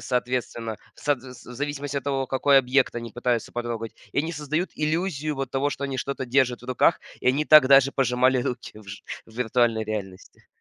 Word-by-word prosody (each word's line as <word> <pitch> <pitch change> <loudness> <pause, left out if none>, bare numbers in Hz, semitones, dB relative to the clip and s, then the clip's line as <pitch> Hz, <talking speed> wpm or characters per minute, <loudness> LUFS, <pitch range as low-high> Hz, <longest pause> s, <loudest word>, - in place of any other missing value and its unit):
соответственно, 120 -3 -2 0.2
в - - -18
сот 145 -4 +1
вс 130 -1 -12
в 125 - -9
зависимости 145 +1 -3
от 135 - -11
того, 135 -2 -1
какой 135 +1 +3
объект 130 +1 +2
они 115 -1 -5
пытаются 120 -2 -1
потрогать. 120 -2 -4 0.2
И - - -1
они 160 +2 -3
создают 155 +3 -2
иллюзию 155 -1 -1
вот 135 -2 -3
того, 135 +2 0
что 140 - -4
они 135 -1 -3
что-то 140 -1 -3
держат 125 -1 +1
в - - -12
руках, 130 -1 +2 0.2
и - - +1
они 140 +4 +2
так 155 -3 +8
даже 140 0 +6
пожимали 130 0 +2
руки 125 -5 -5
в 105 - -14
ж 95 +1 -8 0.2
в 110 - -17
виртуальной 115 -2 +1
реальности. 100 -3 -7
130 Hz, 205 wpm, -25 LUFS, 120-140 Hz, 0.2 s, так